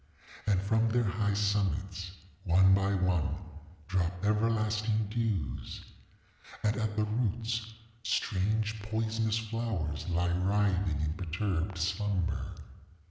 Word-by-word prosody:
And 100 Hz, -3 st, +4 dB
from 110 Hz, +4 st, +2 dB
their 120 Hz, +2 st, +2 dB
high 105 Hz, 0 st, 0 dB
summits, 95 Hz, -3 st, 0 dB, 0.3 s
one 95 Hz, +1 st, +6 dB
by 100 Hz, +1 st, +3 dB
one, 90 Hz, -3 st, +1 dB, 0.5 s
drop 90 Hz, +1 st, -1 dB
everlasting 110 Hz, 0 st, +1 dB
dews. 105 Hz, -, -2 dB, 0.8 s
And 105 Hz, +1 st, +2 dB
at 110 Hz, -3 st, -1 dB
the 110 Hz, -, +2 dB
roots 115 Hz, +1 st, -1 dB, 0.3 s
strange 110 Hz, +1 st, 0 dB
poisonous 110 Hz, +1 st, 0 dB
flowers 110 Hz, -10 st, -2 dB
lie 85 Hz, 0 st, +1 dB
writhing 95 Hz, -4 st, +1 dB
in 75 Hz, 0 st, 0 dB
perturbed 90 Hz, +1 st, -2 dB
slumber. 90 Hz, 0 st, 0 dB
100 Hz, 105 wpm, -31 LUFS, 90-110 Hz, 0.8 s, one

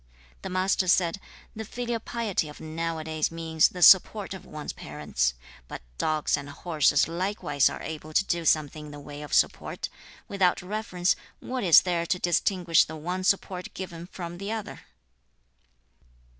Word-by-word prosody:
The -, -, -5 dB
Master 185 Hz, +1 st, +1 dB
said, 175 Hz, 0 st, +3 dB, 0.4 s
'The 220 Hz, -, -5 dB
filial 240 Hz, +1 st, -3 dB
piety 220 Hz, -8 st, -2 dB
of 150 Hz, -, -12 dB
now 165 Hz, +1 st, -3 dB
a 155 Hz, -, -5 dB
days 155 Hz, -1 st, -1 dB
means 160 Hz, -1 st, +2 dB
the 180 Hz, -1 st, -2 dB
support 195 Hz, +2 st, +6 dB
of 190 Hz, -1 st, -10 dB
one's 150 Hz, -1 st, -6 dB
parents. 70 Hz, -5 st, -2 dB, 0.3 s
But -, -, -8 dB, 0.2 s
dogs 155 Hz, -1 st, +1 dB
and 140 Hz, 0 st, -7 dB
horses 150 Hz, -2 st, +2 dB
likewise 170 Hz, -5 st, +1 dB
are -, -, -7 dB
able 155 Hz, 0 st, -7 dB
to 190 Hz, -, +3 dB
do 170 Hz, -3 st, -1 dB
something 155 Hz, -1 st, +1 dB
in -, -, -10 dB
the 145 Hz, -, -9 dB
way 145 Hz, 0 st, -9 dB
of 150 Hz, -, -9 dB
support; -, -, +1 dB, 0.4 s
without 185 Hz, -3 st, +1 dB
reverence, 185 Hz, -2 st, 0 dB, 0.2 s
what 255 Hz, -2 st, -4 dB
is 170 Hz, -4 st, +8 dB
there 170 Hz, -2 st, -1 dB
to 180 Hz, -, +1 dB
distinguish 175 Hz, -1 st, +3 dB
the 160 Hz, -, -8 dB
one 180 Hz, +4 st, -4 dB
support 185 Hz, -1 st, -1 dB
given 175 Hz, -2 st, -7 dB
from 175 Hz, -1 st, -7 dB
the 200 Hz, +2 st, -4 dB
other?' 220 Hz, -2 st, -5 dB
170 Hz, 165 wpm, -27 LUFS, 155-190 Hz, 0.4 s, is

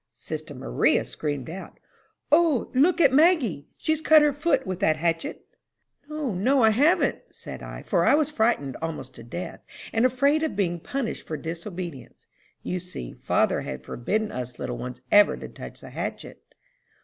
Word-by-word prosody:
Sister -, -, -6 dB
Maria -, -, +1 dB
screamed 145 Hz, -4 st, -4 dB
out, 185 Hz, +4 st, -8 dB, 0.5 s
'O, 310 Hz, -5 st, +3 dB
look 305 Hz, +9 st, +4 dB
at 275 Hz, -6 st, +5 dB
Maggie! 270 Hz, -, +3 dB
She's 315 Hz, 0 st, 0 dB
cut 310 Hz, -1 st, +7 dB
her 295 Hz, -1 st, +3 dB
foot 290 Hz, -2 st, +1 dB
with 185 Hz, -2 st, -4 dB
that 160 Hz, -6 st, +2 dB
hatchet!'" 165 Hz, 0 st, -2 dB, 0.6 s
"'No, 305 Hz, -7 st, -3 dB
no, 250 Hz, +8 st, +3 dB
I 220 Hz, -, +6 dB
haven't,' 290 Hz, +11 st, +3 dB
said -, -, -9 dB
I, -, -, -8 dB
for -, -, +1 dB
I -, -, +5 dB
was 305 Hz, -1 st, +1 dB
frightened 220 Hz, -, +1 dB
almost 155 Hz, -5 st, -5 dB
to 115 Hz, -, -12 dB
death, 175 Hz, +10 st, -6 dB, 0.3 s
and 225 Hz, -, +2 dB
afraid 275 Hz, +5 st, +3 dB
of 315 Hz, -7 st, -1 dB
being 175 Hz, -4 st, 0 dB
punished 265 Hz, +6 st, -4 dB
for 155 Hz, -, -3 dB
disobedience. 170 Hz, -2 st, -7 dB, 0.4 s
You 180 Hz, -, -2 dB
see 180 Hz, -, -8 dB
father -, -, +1 dB
had 65 Hz, 0 st, -6 dB
forbidden 210 Hz, -, -2 dB
us 125 Hz, -1 st, -6 dB
little 120 Hz, -, -4 dB
ones 125 Hz, 0 st, -6 dB
ever 205 Hz, 0 st, +6 dB
to -, -, -7 dB
touch -, -, -10 dB
the -, -, -11 dB
hatchet." -, -, -6 dB
205 Hz, 170 wpm, -25 LUFS, -, 0.6 s, cut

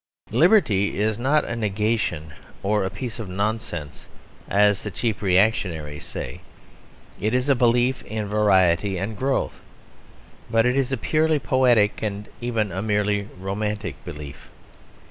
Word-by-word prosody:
Liberty 115 Hz, -, +3 dB
is 110 Hz, +1 st, 0 dB
not 145 Hz, +5 st, +2 dB
a 115 Hz, -, -3 dB
negation 105 Hz, -7 st, -1 dB, 0.3 s
or 105 Hz, +1 st, +1 dB
a 95 Hz, -, -1 dB
piece 120 Hz, +4 st, -6 dB
of 105 Hz, -4 st, -5 dB
nonsense, 95 Hz, -6 st, -3 dB, 0.4 s
as 105 Hz, 0 st, +3 dB
the 105 Hz, -, -4 dB
cheap 110 Hz, +3 st, -2 dB
reactionaries 90 Hz, -7 st, +1 dB
say; -, -, -6 dB, 0.8 s
it 110 Hz, +4 st, 0 dB
is 125 Hz, +2 st, 0 dB
a 140 Hz, -, +5 dB
belief 125 Hz, +1 st, +2 dB
in 110 Hz, -1 st, -3 dB
variety 95 Hz, -3 st, +3 dB
and 100 Hz, +4 st, -3 dB
growth. 135 Hz, +5 st, -1 dB, 0.9 s
But 115 Hz, 0 st, +3 dB
it 125 Hz, +1 st, +2 dB
is 135 Hz, -1 st, 0 dB
a 135 Hz, -, 0 dB
purely 155 Hz, +5 st, +2 dB
poetic 125 Hz, -6 st, +3 dB
and 105 Hz, 0 st, -3 dB
even 115 Hz, -4 st, -1 dB
a 95 Hz, +3 st, -3 dB
merely 105 Hz, -1 st, 0 dB
romantic 100 Hz, -5 st, -3 dB
belief. 75 Hz, -5 st, -9 dB
105 Hz, 140 wpm, -23 LUFS, 95-120 Hz, 0.9 s, a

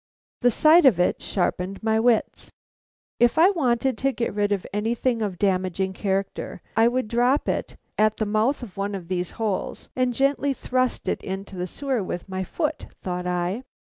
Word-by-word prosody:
The 245 Hz, -, +5 dB
sight 310 Hz, +6 st, +6 dB
of 205 Hz, -9 st, +4 dB
it 180 Hz, -, +1 dB
sharpened 190 Hz, +1 st, -2 dB
my 220 Hz, 0 st, +2 dB
wits. 230 Hz, -1 st, +1 dB, 0.7 s
If 240 Hz, 0 st, +4 dB
I 350 Hz, +5 st, +7 dB
wanted 255 Hz, -, 0 dB
to 275 Hz, +1 st, +2 dB
get 240 Hz, -3 st, -2 dB
rid 205 Hz, 0 st, 0 dB
of 200 Hz, -3 st, 0 dB
anything 230 Hz, +3 st, 0 dB
of 205 Hz, -4 st, -1 dB
a -, -, -23 dB
damaging 190 Hz, 0 st, 0 dB
character, 195 Hz, -1 st, -2 dB, 0.2 s
I 225 Hz, +1 st, +5 dB
would 250 Hz, -1 st, 0 dB
drop 245 Hz, +5 st, +2 dB
it -, -, -2 dB, 0.2 s
at 215 Hz, 0 st, +3 dB
the 215 Hz, -, 0 dB
mouth 220 Hz, +6 st, +1 dB
of 210 Hz, -6 st, -10 dB
one 200 Hz, +1 st, -2 dB
of 180 Hz, -3 st, -8 dB
these 180 Hz, -1 st, -1 dB
holes 215 Hz, -4 st, -3 dB
and 255 Hz, -1 st, +1 dB
gently 275 Hz, +3 st, +1 dB
thrust 255 Hz, -1 st, -1 dB
it -, -, -1 dB
into 195 Hz, +1 st, -5 dB
the 180 Hz, 0 st, -3 dB
sewer 265 Hz, +3 st, -2 dB
with 180 Hz, -1 st, -5 dB
my 190 Hz, 0 st, -3 dB
foot, 305 Hz, -, -3 dB, 0.2 s
thought 180 Hz, -1 st, -3 dB
I. 180 Hz, +5 st, -1 dB
215 Hz, 185 wpm, -24 LUFS, 190-255 Hz, 0.7 s, I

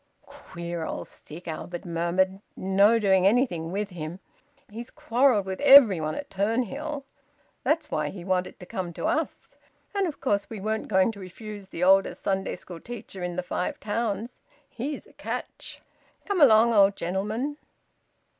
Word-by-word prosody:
"Queer 170 Hz, -1 st, -7 dB
old -, -, -5 dB
stick!" 170 Hz, +4 st, -12 dB
Albert 170 Hz, +2 st, -6 dB
murmured. 175 Hz, +3 st, 0 dB, 0.2 s
"No 200 Hz, +4 st, +4 dB
doing 190 Hz, -3 st, +4 dB
anything 195 Hz, -8 st, +1 dB
with 205 Hz, +1 st, -2 dB
him. 170 Hz, +1 st, -6 dB, 0.5 s
He's 230 Hz, +3 st, -8 dB
quarrelled 240 Hz, -4 st, +2 dB
with 190 Hz, -1 st, -5 dB
everybody 210 Hz, -, +7 dB
at 285 Hz, -1 st, -7 dB
Turnhill. 255 Hz, +8 st, -1 dB, 0.6 s
That's 320 Hz, +1 st, 0 dB
why 150 Hz, -1 st, 0 dB
he 175 Hz, 0 st, -9 dB
wanted 185 Hz, -1 st, -1 dB
to 180 Hz, -, -10 dB
come 180 Hz, -1 st, -4 dB
to -, -, -5 dB
us. -, -, -2 dB, 0.4 s
And 400 Hz, -2 st, +1 dB
of 310 Hz, -, -6 dB
course 205 Hz, -6 st, 0 dB
we 220 Hz, -, -6 dB
weren't 215 Hz, +2 st, -2 dB
going 190 Hz, +2 st, +3 dB
to 205 Hz, -, -12 dB
refuse 200 Hz, +2 st, -9 dB
the 180 Hz, -2 st, -4 dB
oldest 195 Hz, +1 st, +4 dB
Sunday 195 Hz, -1 st, -1 dB
school 175 Hz, -1 st, -10 dB
teacher 225 Hz, -4 st, -8 dB
in 180 Hz, 0 st, -3 dB
th' 180 Hz, -, -2 dB
Five 180 Hz, -, -3 dB
Towns. 220 Hz, +1 st, -3 dB, 0.3 s
He's 280 Hz, +5 st, -5 dB
a -, -, -20 dB
catch... -, -, -6 dB, 0.4 s
Come 400 Hz, -4 st, 0 dB
along, 230 Hz, -3 st, +7 dB
old 200 Hz, -2 st, +5 dB
gentleman!" 210 Hz, +11 st, -2 dB
195 Hz, 155 wpm, -26 LUFS, 180-230 Hz, 0.6 s, everybody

